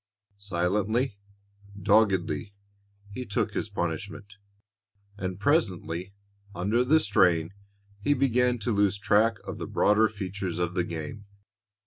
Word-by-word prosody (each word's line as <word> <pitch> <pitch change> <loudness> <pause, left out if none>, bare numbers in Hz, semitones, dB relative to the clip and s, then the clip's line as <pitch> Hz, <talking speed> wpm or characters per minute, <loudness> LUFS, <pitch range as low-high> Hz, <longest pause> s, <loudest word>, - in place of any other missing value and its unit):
Silently, 100 +5 0 0.6
doggedly, 100 0 +2 0.6
he 125 +5 -5
took 105 -1 -1
his 105 - -2
punishment, 100 +2 -4 0.8
and 95 -2 -4
presently, 95 - 0 0.4
under 105 +8 +1
the 155 +5 +4
strain, 90 - +2 0.5
he 145 +8 +2
began 125 -2 +2
to 115 +1 -2
lose 100 -1 +2
track 105 +3 +3
of - - -7
the - - -4
broader 105 +1 +3
features 95 -3 -5
of 85 0 -1
the 90 -1 +1
game. 85 +4 -6
100 Hz, 115 wpm, -27 LUFS, 90-110 Hz, 0.8 s, the